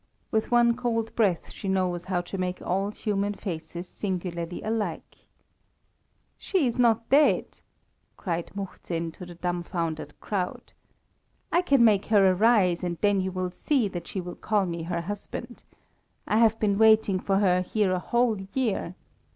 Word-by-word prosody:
With 220 Hz, -1 st, 0 dB
one 240 Hz, -1 st, +4 dB
cold 230 Hz, -2 st, -2 dB
breath 195 Hz, -7 st, +1 dB
she 200 Hz, -, -7 dB
knows 180 Hz, -2 st, 0 dB
how 185 Hz, -2 st, 0 dB
to 175 Hz, -, -8 dB
make 180 Hz, 0 st, -2 dB
all 195 Hz, +3 st, -1 dB
human 205 Hz, -1 st, -2 dB
faces 175 Hz, -1 st, -6 dB
singularly 175 Hz, -3 st, -4 dB
alike. 220 Hz, 0 st, -4 dB, 1.1 s
"She 370 Hz, -7 st, +1 dB
is 245 Hz, 0 st, -1 dB
not 230 Hz, -2 st, +3 dB
dead!" 290 Hz, +3 st, +3 dB, 0.6 s
cried 170 Hz, -3 st, -3 dB
Muhzin 170 Hz, -4 st, -4 dB
to 180 Hz, +2 st, -10 dB
the 175 Hz, -, -10 dB
dumfoundered 170 Hz, -3 st, -3 dB
crowd. 185 Hz, -4 st, -4 dB, 0.8 s
"I 345 Hz, -, +4 dB
can 275 Hz, -9 st, +4 dB
make 205 Hz, -3 st, +3 dB
her 200 Hz, -4 st, +5 dB
arise, 190 Hz, -3 st, +3 dB
and 175 Hz, -1 st, -2 dB
then 205 Hz, -2 st, +3 dB
you 190 Hz, 0 st, -2 dB
will 185 Hz, -1 st, -3 dB
see 255 Hz, +4 st, +1 dB
that 175 Hz, -2 st, -6 dB
she 195 Hz, -, -4 dB
will 175 Hz, -1 st, -6 dB
call 210 Hz, -2 st, 0 dB
me 170 Hz, -2 st, -4 dB
her 170 Hz, +1 st, -2 dB
husband. 205 Hz, +6 st, -7 dB, 0.6 s
I 215 Hz, -, +2 dB
have 225 Hz, -1 st, +4 dB
been 200 Hz, -2 st, +1 dB
waiting 220 Hz, -3 st, +5 dB
for 195 Hz, +1 st, +1 dB
her 180 Hz, -2 st, +3 dB
here 195 Hz, +1 st, 0 dB
a 185 Hz, -, +1 dB
whole 235 Hz, +1 st, +1 dB
year. 215 Hz, -8 st, -1 dB
195 Hz, 160 wpm, -26 LUFS, 180-220 Hz, 1.1 s, her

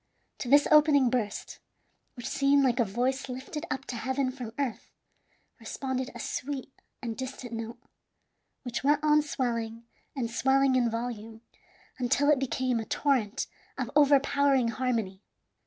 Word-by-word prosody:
To 245 Hz, -, -4 dB
this 285 Hz, +2 st, +6 dB
opening 295 Hz, -4 st, +6 dB
burst, 220 Hz, -5 st, -3 dB, 0.6 s
which 245 Hz, -, -6 dB
seemed 280 Hz, 0 st, +3 dB
like 250 Hz, -1 st, +2 dB
a -, -, +5 dB
voice 250 Hz, +7 st, -1 dB
lifted 270 Hz, +6 st, -6 dB
up 265 Hz, +1 st, -3 dB
to 245 Hz, -, -5 dB
heaven 260 Hz, +2 st, -1 dB
from 250 Hz, -4 st, -7 dB
earth, 275 Hz, -6 st, -3 dB, 0.7 s
responded 260 Hz, -1 st, -3 dB
a -, -, -7 dB
sweet 275 Hz, 0 st, -4 dB, 0.3 s
and 230 Hz, -2 st, -3 dB
distant 260 Hz, -2 st, -6 dB
note, 230 Hz, +1 st, -5 dB, 0.9 s
which 245 Hz, -1 st, -4 dB
went 295 Hz, +2 st, +3 dB
on 300 Hz, 0 st, +5 dB
swelling 235 Hz, -5 st, -3 dB, 0.3 s
and 240 Hz, -4 st, -2 dB
swelling 265 Hz, +2 st, +3 dB
in 245 Hz, -2 st, +3 dB
volume 225 Hz, -1 st, -5 dB, 0.6 s
until 275 Hz, +4 st, +3 dB
it 290 Hz, -, +3 dB
became 255 Hz, -2 st, 0 dB
a 225 Hz, -, -4 dB
torrent 255 Hz, -6 st, 0 dB, 0.3 s
of -, -, -3 dB
overpowering 280 Hz, -3 st, +4 dB
harmony. 225 Hz, -5 st, -2 dB
255 Hz, 140 wpm, -29 LUFS, 235-275 Hz, 0.9 s, this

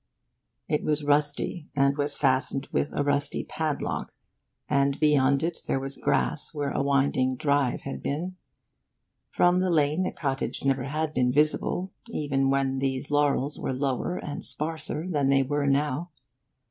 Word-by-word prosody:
It 150 Hz, -, 0 dB
was 150 Hz, 0 st, +1 dB
rusty, 145 Hz, +3 st, 0 dB
and 140 Hz, 0 st, +3 dB
was 145 Hz, 0 st, -1 dB
fastened 135 Hz, 0 st, +1 dB
with 145 Hz, -, 0 dB
a -, -, -1 dB
rusty 145 Hz, 0 st, +1 dB
padlock, 155 Hz, -3 st, -3 dB, 0.5 s
and 140 Hz, -1 st, +1 dB
beyond 140 Hz, -2 st, +3 dB
it 170 Hz, 0 st, -2 dB
there 135 Hz, -, +1 dB
was 135 Hz, +1 st, -6 dB
grass 155 Hz, -, 0 dB
where 145 Hz, -1 st, -1 dB
a -, -, 0 dB
winding 135 Hz, -2 st, +2 dB
'drive' 140 Hz, -2 st, +1 dB
had 70 Hz, -1 st, -6 dB
been. 175 Hz, +6 st, -3 dB, 0.9 s
From 175 Hz, +1 st, +3 dB
the 185 Hz, 0 st, +1 dB
lane 155 Hz, 0 st, +2 dB
the 185 Hz, -, 0 dB
cottage 135 Hz, -1 st, -3 dB
never 135 Hz, -2 st, +1 dB
had 155 Hz, +2 st, -2 dB
been 125 Hz, -2 st, +2 dB
visible, 155 Hz, +6 st, +1 dB, 0.2 s
even 140 Hz, -8 st, 0 dB
when 135 Hz, -1 st, +1 dB
these 135 Hz, +1 st, -2 dB
laurels 145 Hz, -1 st, +1 dB
were -, -, -2 dB
lower 135 Hz, +6 st, -1 dB
and 145 Hz, -, -5 dB
sparser 155 Hz, +1 st, -1 dB
than 145 Hz, -6 st, +1 dB
they 135 Hz, 0 st, +4 dB
were 145 Hz, +1 st, -1 dB
now. 145 Hz, +4 st, 0 dB
145 Hz, 155 wpm, -27 LUFS, 135-150 Hz, 0.9 s, they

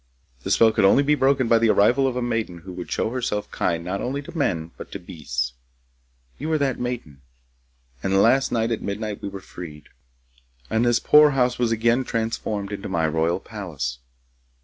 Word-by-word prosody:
The -, -, -5 dB
spell 115 Hz, -1 st, +5 dB
could 110 Hz, -1 st, +1 dB
only 115 Hz, +8 st, +5 dB
be 150 Hz, +1 st, +3 dB
broken 135 Hz, -2 st, +2 dB
by 115 Hz, 0 st, +5 dB
the 115 Hz, 0 st, +3 dB
arrival 125 Hz, +7 st, +4 dB
of 130 Hz, -, -2 dB
a 125 Hz, -, -1 dB
maiden 115 Hz, -7 st, -2 dB
who 90 Hz, -2 st, -8 dB
should 90 Hz, -1 st, -7 dB
show 110 Hz, -, 0 dB
herself 120 Hz, -5 st, -2 dB
kind 85 Hz, 0 st, -1 dB
not 95 Hz, +2 st, -3 dB
only 140 Hz, +3 st, -3 dB
to 175 Hz, +3 st, -11 dB
men 85 Hz, -, -1 dB
but -, -, -10 dB
to 100 Hz, -, -5 dB
beasts. 65 Hz, -8 st, -4 dB, 0.9 s
You 155 Hz, +4 st, -3 dB
are -, -, +3 dB
that 140 Hz, -4 st, 0 dB
maiden, 120 Hz, -, -5 dB, 0.8 s
and 95 Hz, 0 st, +2 dB
last 130 Hz, +6 st, +4 dB
night 115 Hz, 0 st, 0 dB
at 115 Hz, -, -1 dB
midnight 105 Hz, +1 st, -4 dB
we 100 Hz, -, -4 dB
were 100 Hz, -1 st, -8 dB
freed, 80 Hz, -6 st, -10 dB, 0.8 s
and 110 Hz, +1 st, +2 dB
this 120 Hz, -1 st, +3 dB
poor 150 Hz, 0 st, +6 dB
house 125 Hz, -1 st, +2 dB
was 120 Hz, -2 st, +1 dB
again 115 Hz, +3 st, +2 dB
transformed 110 Hz, -3 st, -3 dB
into 100 Hz, -1 st, -5 dB
my 85 Hz, -4 st, +1 dB
royal 80 Hz, +3 st, 0 dB
palace. 75 Hz, -, -5 dB
110 Hz, 195 wpm, -23 LUFS, 90-125 Hz, 0.9 s, poor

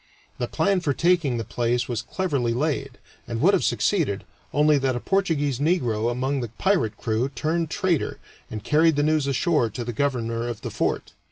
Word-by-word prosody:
The -, -, -1 dB
plan 200 Hz, -2 st, +1 dB
for 150 Hz, -5 st, 0 dB
taking 170 Hz, -6 st, +2 dB
the 115 Hz, -, -2 dB
place 120 Hz, +2 st, -1 dB
was 120 Hz, -2 st, -2 dB
cleverly 130 Hz, -4 st, -1 dB
laid, 140 Hz, -1 st, -2 dB, 0.3 s
and 115 Hz, -1 st, -3 dB
would 185 Hz, -, +4 dB
have -, -, +2 dB
succeeded, 155 Hz, -, +1 dB, 0.3 s
only 150 Hz, 0 st, +4 dB
that 135 Hz, -2 st, 0 dB
a -, -, -1 dB
Portuguese 150 Hz, -8 st, 0 dB
negro 125 Hz, -9 st, +1 dB
among 130 Hz, +3 st, -1 dB
the 120 Hz, -, -3 dB
pirate 190 Hz, -, +1 dB
crew 115 Hz, +4 st, -1 dB
turned 155 Hz, +5 st, -1 dB
traitor 175 Hz, -2 st, 0 dB, 0.3 s
and 110 Hz, -2 st, -6 dB
carried 160 Hz, +1 st, +4 dB
the 145 Hz, -, +2 dB
news 155 Hz, -2 st, +2 dB
ashore 140 Hz, -2 st, +2 dB
to 115 Hz, +3 st, -5 dB
the 120 Hz, 0 st, -4 dB
governor 115 Hz, -3 st, -1 dB
of 120 Hz, -3 st, -5 dB
the -, -, -5 dB
fort. -, -, -2 dB
140 Hz, 185 wpm, -24 LUFS, 120-160 Hz, 0.3 s, would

